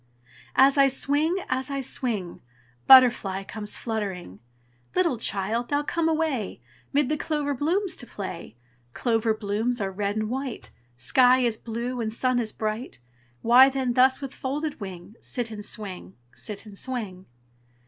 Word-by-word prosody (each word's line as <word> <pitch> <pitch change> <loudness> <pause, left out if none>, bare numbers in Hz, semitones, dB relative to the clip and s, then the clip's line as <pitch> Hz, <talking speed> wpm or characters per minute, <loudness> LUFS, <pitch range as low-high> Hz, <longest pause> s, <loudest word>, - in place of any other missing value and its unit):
As 275 +1 +5
I 275 - +7
swing, 290 +6 +1
as 260 +1 -1
I 275 -1 -2
swing, 225 -9 -3 0.5
Butterfly 240 -7 +6
comes 210 +1 -5
fluttering, 195 - -4 0.6
"Little 340 -10 +2
child, 220 +3 -1
now 290 0 +1
come 330 +2 0
away 310 - -1 0.3
'Mid 285 -1 +2
the 305 - 0
clover 295 -2 -1
blooms 350 +8 0
to 245 - -7
play; 170 - -7 0.4
Clover 225 -2 +1
blooms 220 +4 -1
are 195 -2 -2
red 200 +1 -2
and 215 0 -1
white, 260 +1 -5 0.3
Sky 250 - +4
is 235 -3 +1
blue 235 +2 -4
and 220 -1 -2
sun 255 +2 +1
is 225 -2 -2
bright. 215 +3 -4 0.5
Why 250 +3 +8
then 260 -2 -1
thus, 260 +2 +4
with 275 -1 -6
folded 290 +3 -3
wing, 190 +1 -9
Sit 240 -2 -3
and 210 -1 -7
swing, 185 - -7 0.2
sit 210 0 -7
and 210 -2 -11
swing?" 210 -8 -4
240 Hz, 150 wpm, -26 LUFS, 210-270 Hz, 0.6 s, Why